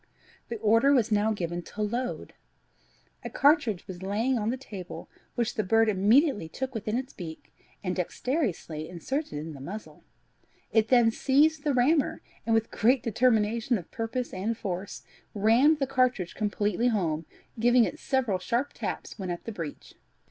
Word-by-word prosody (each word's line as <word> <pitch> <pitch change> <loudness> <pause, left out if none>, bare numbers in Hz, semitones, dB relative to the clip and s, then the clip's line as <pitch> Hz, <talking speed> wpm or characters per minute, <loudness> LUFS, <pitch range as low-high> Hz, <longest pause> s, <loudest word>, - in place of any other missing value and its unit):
The 235 - -3
order 230 +6 +4
was 235 -4 +2
now 210 +1 +3
given 175 -4 -3
"to 210 +4 -5
load." 245 +4 -3 0.9
A - - -4
cartridge 280 - +3
was 185 -2 -8
lying 215 +7 0
on 220 -2 0
the 255 - -1
table, 200 -8 -8 0.3
which 240 -1 0
the 215 - -1
bird 225 +3 +3
immediately 210 - +3
took 260 +9 -4
within 220 0 -2
its 260 +1 -5
beak, 160 -4 -9 0.3
and 180 -2 -1
dexterously 180 - -2
inserted 265 - -3
in 155 +2 -5
the 140 - -10
muzzle; 200 +10 -8 0.7
it 220 -1 +3
then 240 -2 +5
seized 290 +5 +3
the 290 -3 +1
rammer, 275 +4 +2 0.2
and, 225 - +3
with 225 0 0
great 245 +3 +3
determination 230 0 +2
of 175 - -10
purpose 235 +1 -3
and 215 +5 -2
force, 190 -1 -5 0.3
rammed 235 +9 +4
the 275 - 0
cartridge 255 -9 +1
completely 210 +1 0
home, 165 -9 0 0.3
giving 240 +1 +5
it 310 - -3
several 250 -8 0
sharp 245 +8 -1
taps - - -5
when 185 -2 -4
at 175 -1 -4
the 230 - -5
breech. 165 -8 -7
225 Hz, 165 wpm, -28 LUFS, 190-255 Hz, 0.9 s, then